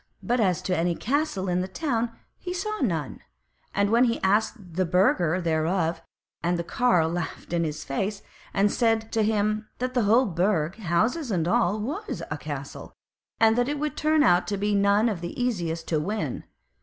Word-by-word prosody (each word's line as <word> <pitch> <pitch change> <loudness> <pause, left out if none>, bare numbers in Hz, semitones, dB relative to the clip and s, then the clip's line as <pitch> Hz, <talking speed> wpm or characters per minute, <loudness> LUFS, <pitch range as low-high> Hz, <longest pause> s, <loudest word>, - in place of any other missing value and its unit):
But 245 +1 +1
as 185 -6 +1
to 185 - 0
any 170 +1 +1
castle 265 - -1
in 180 0 +1
the 185 - -3
town, 235 - -1 0.3
he 360 0 -5
saw 425 +4 -3
none; 165 - -1 0.5
and 200 +1 +1
when 235 +2 +5
he 230 -1 0
asked 210 +5 +2 0.2
a 185 - +2
burgher 180 -1 +2
thereof, 165 0 0 0.4
the 170 0 0
carle 180 -5 +2
laughed 175 0 -4
in 170 -1 +2
his 155 -2 -3
face, 195 +9 -3 0.3
and 200 +1 +2
said 225 -2 +1
to 225 - +1
him 215 0 0
that 255 +1 -2
the 245 -4 +2
whole 235 +6 +5
Burg, 175 -3 0
houses 225 - 0
and 170 -5 0
all, 180 +3 +2
was 305 - -4
a - - -2
castle, - - -7 0.4
and 225 0 +5
that 245 +2 +1
it 295 - -1
would 300 +1 -2
turn 310 -1 +3
out 175 0 +4
to 200 - -1
be 205 +1 0
none 200 +2 +3
of 200 -7 -2
the 175 +6 -6
easiest 170 -10 -2
to 155 - +1
win. 210 +7 -3
200 Hz, 185 wpm, -26 LUFS, 175-235 Hz, 0.5 s, when